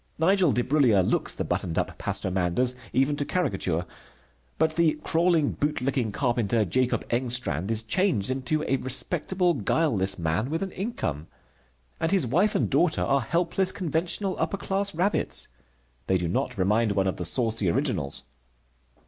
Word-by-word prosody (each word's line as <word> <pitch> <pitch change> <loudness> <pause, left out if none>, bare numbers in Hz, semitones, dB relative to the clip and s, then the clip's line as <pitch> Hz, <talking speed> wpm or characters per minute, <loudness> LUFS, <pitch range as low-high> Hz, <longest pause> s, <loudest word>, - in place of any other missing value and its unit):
Nigel 180 0 +3
Debrullier 120 -4 +3
looks - - 0
the - - -2
buttoned 85 -2 -2
up - - -1
Pastor 95 - -1
Manders, 95 +8 +1 0.2
even 135 +3 +2
to 145 - 0
caricature. 95 - -1 0.7
But 160 0 +1
the 165 -3 +2
crawling, 165 -3 +2
bootlicking 135 -5 -1
carpenter, 120 -3 0
Jacob 125 +6 0
Engstrand, 120 - 0
is 115 0 -1
changed 125 - 0
into 135 +4 -1
a 135 - +1
respectable, 175 +7 0
guileless 105 - +1
man 85 +8 -1
with 165 +4 -1
an 190 - -5
income. 85 - -4 0.7
And 165 - 0
his 195 -7 +3
wife 180 - +2
and - - +2
daughter 170 -2 +2
are 140 0 +2
helpless, 170 +7 0
conventional, 180 +3 -1
upper 200 - -1
class 195 0 -2
rabbits. 185 +5 0 0.6
They 95 - +3
do 90 -1 -2
not 85 - -2
remind 105 +3 +2
one 95 -1 +1
of 95 - -1
the - - -3
saucy 110 0 +1
originals. 70 -4 -1
130 Hz, 150 wpm, -26 LUFS, 100-170 Hz, 0.7 s, Nigel